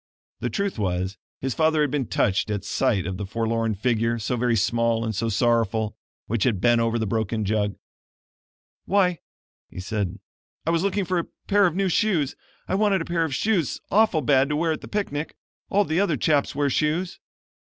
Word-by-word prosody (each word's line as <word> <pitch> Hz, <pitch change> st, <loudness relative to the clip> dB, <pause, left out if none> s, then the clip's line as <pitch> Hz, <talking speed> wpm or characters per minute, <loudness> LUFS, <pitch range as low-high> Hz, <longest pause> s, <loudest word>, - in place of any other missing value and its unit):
The -, -, -2 dB
truth 200 Hz, -, -2 dB
was 95 Hz, -1 st, -2 dB, 0.2 s
his 130 Hz, -1 st, -1 dB
father 160 Hz, -1 st, +2 dB
had 145 Hz, -3 st, +1 dB
been 140 Hz, -5 st, -1 dB
touched 100 Hz, +2 st, +1 dB
at 105 Hz, -1 st, -3 dB
sight 105 Hz, -4 st, +1 dB
of 95 Hz, 0 st, -3 dB
the 100 Hz, -, -4 dB
forlorn 115 Hz, +1 st, -1 dB
figure, 115 Hz, +2 st, +1 dB
so 115 Hz, +3 st, -2 dB
very 120 Hz, -1 st, +1 dB
small 115 Hz, +1 st, +1 dB
and 110 Hz, -, -2 dB
so 115 Hz, +3 st, -1 dB
sorrowful, 110 Hz, -1 st, +1 dB, 0.3 s
which 110 Hz, -2 st, -1 dB
had 115 Hz, -7 st, +1 dB
bent 120 Hz, +2 st, +4 dB
over 115 Hz, 0 st, +1 dB
the 110 Hz, -, -1 dB
broken 110 Hz, +1 st, -1 dB
jug. 105 Hz, -1 st, 0 dB, 1.1 s
"Why," 185 Hz, -4 st, +2 dB, 0.5 s
he -, -, -9 dB
said, 100 Hz, -1 st, -3 dB, 0.5 s
"I 165 Hz, -, +2 dB
was 165 Hz, -1 st, +2 dB
looking 200 Hz, 0 st, 0 dB
for 180 Hz, 0 st, 0 dB
a 170 Hz, -, -4 dB, 0.2 s
pair 200 Hz, -1 st, +4 dB
of 170 Hz, -, -3 dB
new 195 Hz, 0 st, +1 dB
shoes. 175 Hz, -, +1 dB, 0.3 s
I -, -, -2 dB
want 200 Hz, -1 st, +3 dB
a 165 Hz, -, -4 dB
pair 170 Hz, -1 st, 0 dB
of 150 Hz, -4 st, -2 dB
shoes 195 Hz, -, 0 dB
awful 200 Hz, -7 st, +3 dB
bad 135 Hz, +1 st, +3 dB
to 150 Hz, -, 0 dB
wear 165 Hz, +2 st, +1 dB
at 155 Hz, -, -3 dB
the -, -, -9 dB
picnic. 160 Hz, -7 st, -3 dB, 0.3 s
All 205 Hz, +1 st, +3 dB
the 160 Hz, +1 st, 0 dB
other 170 Hz, -7 st, +2 dB
chaps 145 Hz, +2 st, +1 dB
wear 145 Hz, -1 st, +1 dB
shoes." 160 Hz, +6 st, 0 dB
125 Hz, 195 wpm, -24 LUFS, 110-170 Hz, 1.1 s, bent